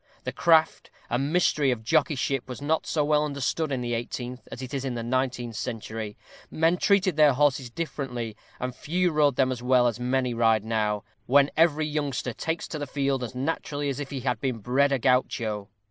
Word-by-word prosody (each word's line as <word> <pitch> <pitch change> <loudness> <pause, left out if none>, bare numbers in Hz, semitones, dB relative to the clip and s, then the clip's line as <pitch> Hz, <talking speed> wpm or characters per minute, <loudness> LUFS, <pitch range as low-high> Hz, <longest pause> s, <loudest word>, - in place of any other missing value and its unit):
The - - -3
craft 160 -1 +3 0.2
and 135 +5 0
mystery 155 -5 +3
of 120 -3 -1
jockeyship 140 -2 +1
was 125 - -6
not 155 +3 0
so 150 -2 +1
well 150 0 +3
understood 145 +2 -1
in 130 -2 -1
the 120 -1 -2
eighteenth 120 +2 -5
as 130 - -7
it 130 - -7
is 135 -2 -2
in 130 -3 -3
the 115 - -3
nineteenth 125 -1 -1
century; 110 -2 -5 0.3
men 165 +2 +2
treated 185 -4 +2
their 150 -2 +6
horses 135 -2 +2
differently, 125 -6 -4 0.2
and 125 0 -3
few 175 +7 0
rode 150 -3 +3
them 130 0 +2
as 125 -2 -4
well 125 0 +4
as 120 -1 0
many 125 0 0
ride 115 -2 +2
now, 105 -2 0 0.2
when 140 +2 +5
every 155 -1 +3
youngster 145 -5 -2
takes 160 +7 -3
to 155 - -4
the 145 - -4
field 135 -2 -1
as 120 +1 -6
naturally 145 +1 -2
as 135 0 -3
if 145 -2 -5
he 135 -3 -4
had 125 -3 -1
been 130 -4 -1
bred 130 +6 +2
a 135 - +3
Guacho. 115 -5 0
130 Hz, 200 wpm, -26 LUFS, 120-150 Hz, 0.3 s, their